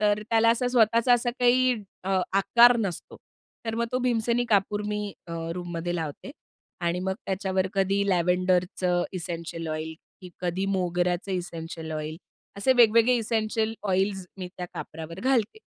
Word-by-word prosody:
तर 210 0 +2
त्याला 225 0 +4
असा 240 +2 +1
स्वतःचा 235 0 +4
असा 240 0 0
काही 255 +1 +4 0.3
अ, 190 0 +1
आकार 235 +5 +6
नसतो. 200 -7 -4 0.5
तर 225 - -1
मग 235 +1 0
तो 255 - +1
भीमसेनी 240 -1 +1
कापूर 205 0 +2
मी 210 -1 -3
अ, 170 - -7 0.2
रूममध्ये 175 -1 -4
लावते 160 - -5 0.5
आणि 170 0 0
मग 190 +1 -1
त्याच्यावर 190 -1 0
कधी 195 +1 +2
लॅव्हेंडरचं 180 0 +1
इसेंशियल 170 -2 -5
ऑइल, 155 +1 -4 0.3
की 185 - -10
कधी 180 +1 -1
मोगऱ्याचं 180 0 0
इसेंशियल 165 -2 -5
ऑइल. 155 0 -4 0.4
असे 200 +6 +3
वेगवेगळे 230 0 +5
इसेंशियल 220 -1 -1
ऑइल्स 190 0 0
मी 180 -1 -5
त्या 180 - -5
कापरावर 165 +3 -7
घालते. 255 - +1
195 Hz, 145 wpm, -26 LUFS, 175-225 Hz, 0.5 s, आकार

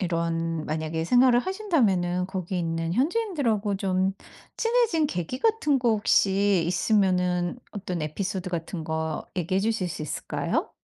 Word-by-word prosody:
이런 165 -2 -1
만약에 160 +1 -2
생활을 245 +5 +5
하신다면은 225 - +1
거기 185 -1 -3
있는 165 -1 -2
현지인들하고 260 - 0
좀 190 -1 0 0.4
친해진 455 -9 +2
계기 180 - -4
같은 365 -8 +2
거 240 -2 +2
혹시 200 -3 +3
있으면은 180 0 +1
어떤 180 -5 -4
에피소드 185 +4 -3
같은 170 0 -4
거 160 -1 -3
얘기해 185 +2 0
주실 215 -3 0
수 160 - -5
있을까요? 150 - -2
190 Hz, 315 characters per minute, -26 LUFS, 170-240 Hz, 0.4 s, 생활을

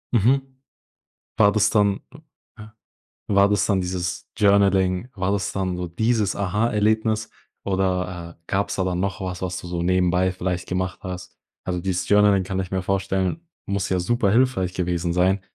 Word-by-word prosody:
Mhm. 125 +5 +4 1.0
War 100 -2 +5
das 105 -1 +3
dann 100 -2 +2
m 150 +3 -14 0.4
ja. 110 0 -12 0.5
War 100 0 +4
das 105 -1 +1
dann 100 -3 +2
dieses 90 -1 -3
Journaling? 100 -1 +3
War 95 -1 -1
das 100 -1 -1
dann 95 -2 -2
so 90 0 -3
dieses 110 +3 0
Aha-Erlebnis 110 +2 +1 0.3
oder, 90 -3 -2
äh, - - -43
gab's 100 +1 -1
da 95 - 0
dann 90 -1 -1
noch 100 +2 -2
was, 90 -1 -5
was 90 -1 -3
du - - -10
so 85 -1 -2
nebenbei 90 0 +2
vielleicht 90 -1 -3
gemacht 90 0 -2
hast? 90 -1 -7 0.3
Also, 90 -1 -2
dieses 95 0 -2
Journaling, 105 -2 +4
kann 95 0 -2
ich 95 -1 -5
mir 95 -1 -1
vorstellen, 95 - -1 0.3
muss 100 -1 -1
ja 95 - +1
super 115 +2 +1
hilfreich 115 -6 +2
gewesen 90 -1 -1
sein, 95 +3 +2
95 Hz, 170 wpm, -23 LUFS, 90-105 Hz, 1.0 s, War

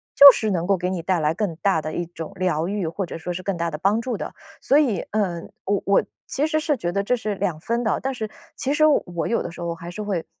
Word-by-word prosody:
就 280 0 +12
是 220 - -1
能 175 -3 0
够 200 - +4
给 180 +1 -1
你 185 -2 -2
带 180 -1 +1
来 155 +1 +1
更 205 -5 -1
大 190 -5 +2
的 155 - -4
一 175 - -2
种 165 -2 -8
疗 175 -3 0
愈， 195 -3 -2
或 185 +4 -3
者 170 - -7
说 180 - -4
是 180 +1 -5
更 195 0 -1
大 170 0 -1
的 150 - -4
帮 200 +7 +2
助 235 -2 -3
的。 - - -5 0.3
所 280 - +4
以， 235 - +2
呃， 190 -5 0 0.2
我 200 0 +1
我 200 - +4 0.2
其 295 +3 0
实 310 0 +1
是 305 -1 +1
觉 175 -6 -2
得 200 +2 0
这 250 +5 +2
是 215 -4 -3
两 185 -5 -2
分 235 +7 -1
的， 220 - +1
但 270 - -1
是 220 -4 -4 0.3
其 275 +1 0
实 310 +1 +4
我 175 - +1
有 230 - 0
的 175 - -5
时 170 - -10
候 170 -1 -2
还 170 +1 -8
是 215 - -6
会 195 -5 -2
195 Hz, 300 characters per minute, -23 LUFS, 170-225 Hz, 0.3 s, 就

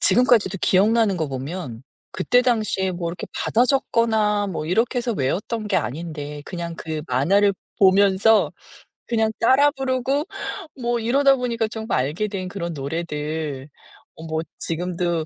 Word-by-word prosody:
지금까지도 240 - +3
기억나는 205 +1 +3
거 160 -4 -2
보면 135 -2 -6 0.3
그때 245 +7 +2
당시에 215 -6 +1
뭐 175 -1 -3
이렇게 175 - -7
받아 235 +3 +2
적거나 220 -6 +1
뭐 165 -4 -4
이렇게 225 +8 +1
해서 240 -1 -1
외웠던 210 - -2
게 195 - +2
아닌데 150 +3 -4
그냥 170 -2 -5
그 155 -1 -5
만화를 190 +11 +3 0.2
보면서 200 +2 +4 0.6
그냥 225 -2 +1
따라 270 +5 +5
부르고 270 +1 -1 0.6
뭐 240 0 0
이러다 270 +4 +4
보니까 235 -3 -1
전부 220 +1 -5
알게 150 +11 -1
된 185 -2 -4
그런 170 -3 -4
노래들 150 -1 -4 0.5
어 160 - -10
뭐 160 0 -2 0.2
지금도 175 -1 -2
195 Hz, 305 characters per minute, -22 LUFS, 160-230 Hz, 0.6 s, 따라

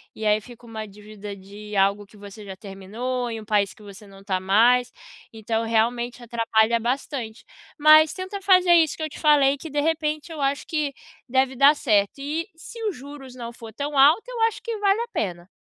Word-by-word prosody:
e 220 - -6
aí 210 0 +3
fica 240 +1 -14
uma 220 -2 -7
dívida 210 0 -10
de 205 +2 -10
algo 200 +1 +2
que 210 - -20
você 205 +1 -11
já 190 -1 -8
terminou 220 +6 -5
em 225 -1 -5
um 215 - -11
país 205 -3 +1
que 215 - -18
você 205 +1 -12
não 195 0 -15
tá 190 -2 -1
mais, 235 +6 +3 0.4
então 225 0 -2
realmente 235 +2 0
atrapalha 230 -1 +1
bastante, 240 -1 -4 0.3
mas 310 0 +6
tenta 375 +2 -6
fazer 365 -2 +5
isso 320 -3 +3
que 315 - -5
eu 310 - -3
te - - -11
falei, 285 -2 +4
que, 320 +3 -9
de 290 - -2
repente, 310 0 -1
eu 310 - -6
acho 275 +1 -1
que 300 -3 -2 0.4
deve 260 +1 +1
dar 280 +3 +6
certo, 210 -3 +1
e 310 +6 -3
se 460 +8 -11
os 410 - -1
juros 270 -1 -11
não 235 -1 -7
for 225 -2 -11
tão 285 +2 -4
alto, 300 +10 +6
eu - - -5
acho 450 -1 +1
que 460 -2 -4
vale 410 +1 +2
a 475 - -4
pena. 175 -2 -3
245 Hz, 205 wpm, -24 LUFS, 210-300 Hz, 0.4 s, mas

